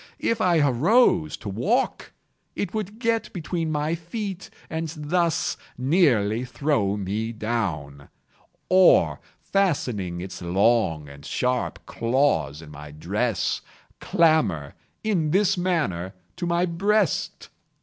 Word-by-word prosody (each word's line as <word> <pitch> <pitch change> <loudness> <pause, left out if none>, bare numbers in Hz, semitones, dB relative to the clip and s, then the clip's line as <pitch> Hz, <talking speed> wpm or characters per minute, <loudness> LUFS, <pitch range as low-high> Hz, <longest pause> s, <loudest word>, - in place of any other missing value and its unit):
If 230 -1 0
I 175 -2 +3
arose 165 - +3
to 110 - -10
walk 195 - -1 0.4
it 205 - -3
would 215 -1 -4
get 230 -1 0
between 165 -2 -3
my 150 +1 0
feet 190 +3 -5 0.2
and 160 -1 -3
thus 165 +2 0 0.2
nearly 125 - +2
throw 120 -5 0
me 105 +3 -2
down, 90 -12 -3 0.6
or, 185 0 +5 0.2
fastening 125 - -1
its 90 0 -7
long 90 -3 +2
and 70 0 -12
sharp 125 - -2
claws 115 - 0
in 75 - -12
my 75 0 -10
dress, 75 +1 -1 0.4
clamber, 155 - +2 0.3
in 185 -8 +1
this 195 +3 +3
manner, 150 - -1 0.2
to 175 -2 -3
my 170 +1 +2
breast. 195 +2 0
145 Hz, 115 wpm, -24 LUFS, -, 0.6 s, or